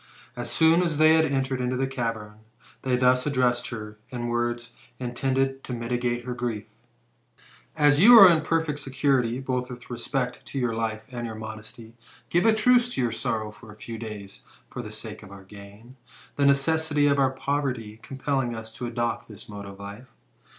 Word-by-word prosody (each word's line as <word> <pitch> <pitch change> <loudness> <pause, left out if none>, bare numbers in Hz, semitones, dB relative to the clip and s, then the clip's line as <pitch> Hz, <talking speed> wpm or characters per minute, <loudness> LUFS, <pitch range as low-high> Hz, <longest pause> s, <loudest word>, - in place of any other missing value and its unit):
As 120 -1 -5
soon 160 +7 +4
as 170 -4 0
they 155 +1 +6
had 160 0 +4
entered 135 -3 -1
into 125 0 -1
the 135 - +1
cavern, 115 -5 -4 0.4
they 130 -1 +1
thus 125 +1 +3
addressed 125 -3 +1
her, 105 -2 -7
in 120 -2 -4
words 120 0 -2 0.2
intended 135 +2 -1
to 125 - -5
mitigate 120 0 -2
her 125 - -3
grief: 120 -3 -3 0.6
" - - -27 0.2
As 145 -1 +4
you 235 +6 +9
are 195 -3 +12
in 165 -3 +4
perfect 160 -2 -1
security, 135 -3 0
both 125 -1 -2
with 125 0 -10
respect 125 +1 -3
to - - -6
your 120 -3 0
life 110 -1 -2
and 120 -1 -4
your 110 - -6
modesty, 110 +1 -9 0.4
give 175 +6 +3
a 220 - +5
truce 245 +2 +4
to - - 0
your 120 -2 +1
sorrow 110 -1 -2
for 105 +1 -14
a - - -13
few 110 +1 -8
days, 105 -3 -8 0.3
for - - -5
the - - -8
sake - - -7
of - - -12
our 100 -1 -11
gain, 100 +6 -14 0.4
the 140 -1 +3
necessity 145 +1 +2
of 140 -2 +3
poverty 130 -6 -2
compelling 135 -3 -2
us 110 0 -8
to 120 - -5
adopt 120 0 -2
this 105 0 -12
mode 100 -2 -8
of 100 0 -10
life. 100 +5 -9
125 Hz, 185 wpm, -26 LUFS, 115-140 Hz, 0.6 s, are